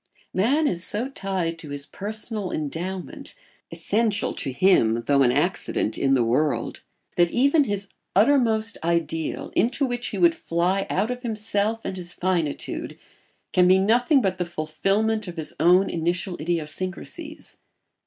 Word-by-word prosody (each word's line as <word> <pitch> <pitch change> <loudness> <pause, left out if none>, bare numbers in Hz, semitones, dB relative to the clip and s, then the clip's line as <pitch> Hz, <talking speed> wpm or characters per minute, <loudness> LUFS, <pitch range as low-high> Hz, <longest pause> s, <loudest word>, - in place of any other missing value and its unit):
Man 275 +11 +2
is 175 -6 -1
so 230 +8 -1
tied 185 -8 -3
to 155 - -8
his 140 0 -5
personal 210 +1 -4
endowment 175 - -5 0.4
(essential 220 0 0
to 135 - -3
him 120 -8 +3
though 140 -1 +3
an 125 -2 +5
accident 145 - 0
in 135 -1 +2
the 125 - +3
world) 125 +1 0 0.4
that 175 -1 +4
even 280 - +3
his 205 -3 -2 0.3
uttermost 225 -1 +3
ideal, 165 -1 -1
into 245 +6 +2
which 245 -1 -2
he - - -4
would 340 -1 +5
fly 185 - 0
out 210 +6 0
of 250 0 -5
himself 220 -1 -1
and 190 - -4
his 175 -1 -7
finitude, 175 -6 -2 0.6
can 180 -1 +5
be 185 +1 +6
nothing 245 +7 +3
but 190 -2 0
the - - +2
fulfilment 195 +7 -1
of 175 -1 -7
his 160 - -4
own 180 +3 +5
initial 175 +2 -1
idiosyncrasies. 185 - -4
190 Hz, 145 wpm, -24 LUFS, 165-220 Hz, 0.6 s, be